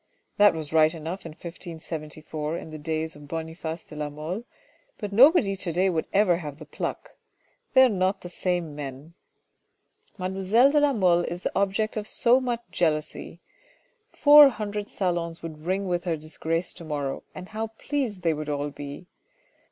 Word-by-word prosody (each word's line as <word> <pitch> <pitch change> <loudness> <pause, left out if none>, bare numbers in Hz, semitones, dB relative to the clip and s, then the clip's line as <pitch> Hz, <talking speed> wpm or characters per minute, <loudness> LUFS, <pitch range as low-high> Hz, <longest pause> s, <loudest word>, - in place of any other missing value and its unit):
That 205 -3 +6
was 155 -1 -5
right 160 +1 +5
enough 165 +3 -6
in 160 - -9
1574 160 -2 -6
in 160 - -8
the 155 - -7
days 160 +1 -3
of 150 0 -13
Boniface 160 +1 -5
de 155 - -13
la 150 0 -3
Mole, 160 +10 -5 0.5
but 205 -2 -5
nobody 245 - +6
to 185 -2 -4
day 185 +3 +2
would 160 -2 -1
ever 195 -4 +4
have 150 -5 -7
the 155 - -10
pluck. - - -5 0.6
They 260 - +9
are - - +7
not 190 -3 0
the - - -7
same 175 -3 -2
men. 145 +2 -7 1.0
Mademoiselle 195 +7 +3
de 300 - +4
la 290 -1 +3
Mole 180 -6 +3
is 175 +1 -5
the - - -3
object 200 +3 0
of 210 0 -3
so 245 +2 +4
much 240 -2 -2
jealousy. 160 0 -1 0.7
Four 295 -1 +8
hundred 210 -3 -4
salons 170 -3 -2
would 155 -1 -8
ring 190 +1 0
with 175 0 -1
her 165 -2 0
disgrace 160 +2 -3
to 175 - -11
morrow, 145 -3 -3
and 185 - -8
how 220 +1 -3
pleased 225 -3 -3
they 165 -2 +3
would 150 0 -5
all 145 0 -2
be. 145 +4 -8
175 Hz, 175 wpm, -26 LUFS, 155-200 Hz, 1.0 s, They